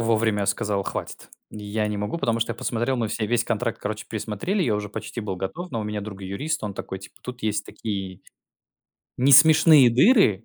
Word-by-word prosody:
вовремя 110 -3 +1
сказал: 105 -3 0
"Хватит. - - -6 0.2
Я 105 0 -3
не 105 -1 -3
могу", 105 +11 -3
потому 115 -7 0
что 115 - 0
я - - -11
посмотрел, 120 +3 -1
мы 115 -3 -1
все 110 0 -2
весь 120 +1 +1
контракт, 115 0 -2
короче, 105 +1 -5
пересмотрели. 115 - -2
Я 110 -9 +1
уже 105 0 -3
почти 115 +3 -6
был 100 -3 -4
готов, 150 - -5
но 115 - -3
у 105 - -4
меня 105 0 -3
друг- 100 -1 -8
юрист. 110 +12 -3
Он 100 -2 -4
такой, 95 - -6
типа: 95 - -14
"Тут 125 -1 -8
есть 105 -1 -1
такие 95 -4 -6 1.0
несмешные 145 0 +7
дыры". 120 - +4
110 Hz, 195 wpm, -24 LUFS, 105-125 Hz, 1.0 s, несмешные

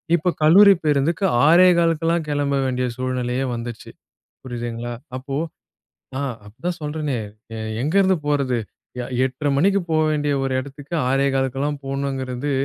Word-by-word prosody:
இப்போ 175 +2 0
கல்லூரி 195 +6 +8
பேருந்துக்கு 155 +5 +1 0.2
6:15க்கெல்லாம் 170 -1 +4
கிளம்ப 145 -1 0
வேண்டிய 125 -1 0
சூழ்நிலையே 130 0 -1
வந்துச்சு, 115 -1 -7 0.5
புரியுதுங்களா? 120 -1 -5 0.2
அப்போ. 135 +2 -4 0.8
ஆ, - - -2 0.2
அதான் 170 +12 -5
சொல்றனே 150 -3 -2 0.4
எ - - -5 0.2
எங்கிருந்து 190 +6 +3
போறது 140 -4 +1 0.4
எ - - -4 0.2
8:30 135 +3 -2
மணிக்கு 195 +6 +3
போக 155 -1 +2
வேண்டிய 150 -1 0
ஒரு 135 -1 -1
இடத்துக்கு 140 +3 -9 0.2
6:15க்கெல்லாம் 135 +1 0
போணுங்கிறது 135 0 -3
140 Hz, 120 wpm, -22 LUFS, 130-160 Hz, 0.8 s, கல்லூரி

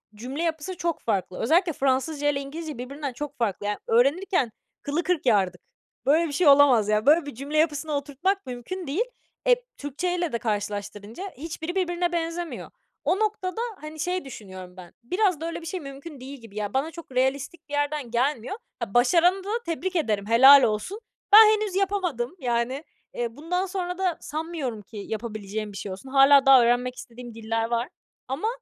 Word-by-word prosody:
cümle 260 +9 -5
yapısı 330 +2 -3
çok 340 -1 -2
farklı. 190 -4 -2
Özellikle 330 +7 +3
Fransızca 275 +3 +1
ile 280 -1 0
İngilizce 305 +1 -6
birbirinden 275 +2 -5
çok 290 +2 -6
farklı. 205 -4 -1
Ya, 210 0 -1
öğrenirken 275 - +2 0.3
kılı 300 +5 -1
kırk 345 -3 0
yardık. 190 -7 +2 0.4
Böyle 315 +5 +4
bir 290 - -6
şey 320 +3 +2
olamaz 275 -7 +6
ya. 215 0 +2
Böyle 310 +3 +5
bir 285 -5 -7
cümle 280 +4 -4
yapısını 305 0 +1
oturtmak 295 +8 -1
mümkün 260 +8 -6
değil. 330 +12 +1 0.4
Eee, - - +4
Türkçeyle 345 +4 -2
de 235 - 0
karşılaştırınca 205 - -4
hiçbiri 325 +3 -5
birbirine 350 -1 0
benzemiyor. 335 0 -3 0.3
O 380 - +1
noktada, 425 -1 -1 0.2
hani, 305 0 -9
şey, 360 +2 -2
düşünüyorum 185 -7 -10
ben. 180 -2 -12
Biraz 365 - +1
da - - -3
öyle 335 0 -4
bir - - -10
şey 365 +3 -4
mümkün 275 0 -9
değil 270 +2 -8
gibi. 225 -3 -14
Ya 210 -1 -3
bana 275 +5 0
çok 330 -3 -11
realistik 275 +5 -1
bir 290 - -9
yerden 290 -4 -1
gelmiyor. 250 - 0 0.2
Ha, 230 -5 -5
başaranı 345 +10 +4
da 400 - -7 0.2
tebrik 355 +3 -3
ederim. 215 - 0
Helal 265 +4 +9
olsun. 220 - -1 0.3
Ben 440 +1 +12
henüz 425 -3 -3
yapamadım. 370 - -1
Yani, 245 +2 -1 0.3
eee, 240 +1 -4
bundan 360 +5 -1
sonra 360 -2 -3
da 370 -3 0
sanmıyorum 305 -8 -4
ki 210 +2 -13
yapabileceğim 215 0 -5
bir 200 - -9
şey 195 - -5
olsun. 195 +8 -9
Hâlâ 275 +1 +6
daha 270 -2 +8
öğrenmek 245 +1 +1
istediğim 240 -1 -10
diller 225 0 -1
var 235 +3 -1 0.4
ama 270 +11 -2
280 Hz, 175 wpm, -25 LUFS, 235-340 Hz, 0.4 s, Ben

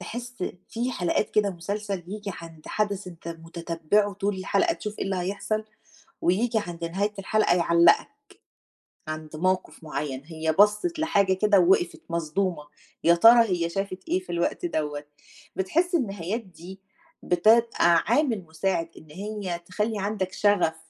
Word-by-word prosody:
تحس 245 +1 -6 0.4
في 240 +2 -2
حلقات 180 +2 0
كده 205 -2 +2
مسلسل 200 +2 -4
ييجي 205 +1 -5
عند 165 -2 -12
حدث 205 -2 -1
أنت 170 -1 -9
متتبعه 165 +4 -1
طول 200 0 -1
الحلقة 335 - +1
تشوف 210 -1 -7
إيه - - -2
اللي 195 -1 -1
هيحصل، 205 +4 -2 0.6
وييجي 220 +6 +2
عند 170 -1 -6
نهاية 200 +5 -1
الحلقة 205 -1 +2
يعلّقك، 170 0 +4 1.0
عند 155 0 -6
موقف 185 +1 -1
معيّن، 140 -3 -4
هي 160 -1 -2
بصِّت 210 +12 +4
لحاجة 200 -12 +2
كده 200 +1 +4
ووقفت 175 -1 +2
مصدومة، 170 0 -1 0.4
يا 170 +1 +6
ترى 230 +6 +8
هي 170 -2 0
شافت 195 0 -5
إيه 185 - +2
في 180 -2 -10
الوقت 170 - -1
دوّة! 150 - -2 0.5
بتحس 340 - +1
النهايات 205 - -2
دي، 185 0 -12 0.4
بتبقى 195 -2 +4
عامل 250 -10 +2
مساعد 165 +1 -1
إن 155 - -14
هي 195 -1 -4
تخلّي 210 +4 -2
عندك 190 -2 -2
شغف 190 -5 +2
190 Hz, 140 wpm, -26 LUFS, 170-210 Hz, 1.0 s, ترى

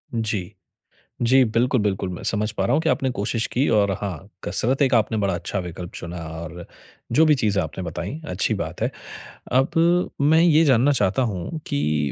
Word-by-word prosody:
जी। 105 -3 -2 0.7
जी, 130 +2 +5
बिल्कुल, 120 +3 +1
बिल्कुल, 95 -2 -1
मैं 90 - -7
समझ 105 0 0
पा 100 -3 -2
रहा - - +1
हूँ 155 - +3
कि 160 - 0
आपने 135 - +1
कोशिश 110 +2 -1
की 130 +4 0
और 100 -2 +3
हाँ, 95 -8 -5
कसरत 130 +5 0
एक 130 -3 +3
आपने 110 0 +2
बड़ा 100 -2 0
अच्छा 85 +3 -3
विकल्प 90 -1 -7
चुना 85 0 -7 0.2
और 85 +1 -8 0.5
जो 155 +7 +5
भी 150 -2 +5
चीज़ें 105 -6 +1
आपने 80 +4 -6
बताई, 90 - -5
अच्छी 90 - 0
बात - - -5
है। - - 0 0.6
अब 165 +7 +2
मैं 160 +3 +5
ये 165 -2 +5
जानना 135 0 +4
चाहता 105 -1 +1
हूँ 95 - -5
कि 75 -1 0
105 Hz, 190 wpm, -23 LUFS, 90-135 Hz, 0.7 s, जी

